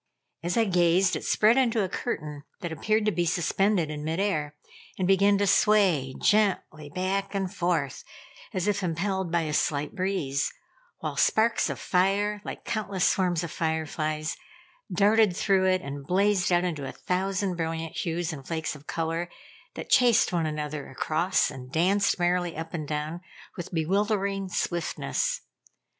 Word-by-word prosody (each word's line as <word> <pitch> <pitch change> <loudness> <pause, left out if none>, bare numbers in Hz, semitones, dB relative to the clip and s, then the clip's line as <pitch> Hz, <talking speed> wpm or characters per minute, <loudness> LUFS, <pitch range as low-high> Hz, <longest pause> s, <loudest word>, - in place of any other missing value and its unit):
As 175 +4 -2
I 230 - +4
gazed, 180 0 +3
it - - -4
spread 220 +4 +4
into 235 -5 +2
a - - 0
curtain 150 -8 -4 0.2
that 175 - -4
appeared 215 +7 0
to 215 - +3
be 175 - 0
suspended 175 0 +1
in 150 -1 -5
mid 160 +3 -2
air, 155 -7 -1 0.4
and 185 - 0
began 200 +1 +4
to 205 - +2
sway 195 -10 +3
gently 195 -8 +1
back 190 +5 -2
and 195 -1 -2
forth, 170 -8 -1 0.5
as 185 +1 -2
if 200 -1 +1
impelled 185 +1 -1
by 170 -1 +2
a 155 -2 -3
slight 150 -1 0
breeze, 180 -8 -1 0.5
while - - -3
sparks 230 +1 +3
of - - -4
fire, 200 +3 +1
like - - -7
countless 205 -5 -1
swarms 180 -3 +1
of 170 - -5
fire 160 -1 -1
flies, 155 +1 -2 0.6
darted 205 0 +4
through 190 -2 +2
it 185 -1 +2
and 140 0 -7
blazed 190 0 +2
out 175 0 +3
into 155 -6 -3
a - - -5
thousand 190 +1 -1
brilliant 165 -1 -3
hues 170 -1 -2
and 135 -3 -9
flakes 160 -2 -3
of 150 0 -15
color 165 +1 -2 0.5
that - - -7
chased 240 -6 +5
one 165 -2 +1
another 150 -1 -4
across 155 +5 +1
and 130 -2 -10
danced 190 +6 +2
merrily 175 -1 0
up 165 0 -6
and 155 -4 -4
down 155 +3 -3 0.3
with 175 -4 -7
bewildering 195 +3 0
swiftness. - - -1
180 Hz, 160 wpm, -27 LUFS, 160-200 Hz, 0.6 s, chased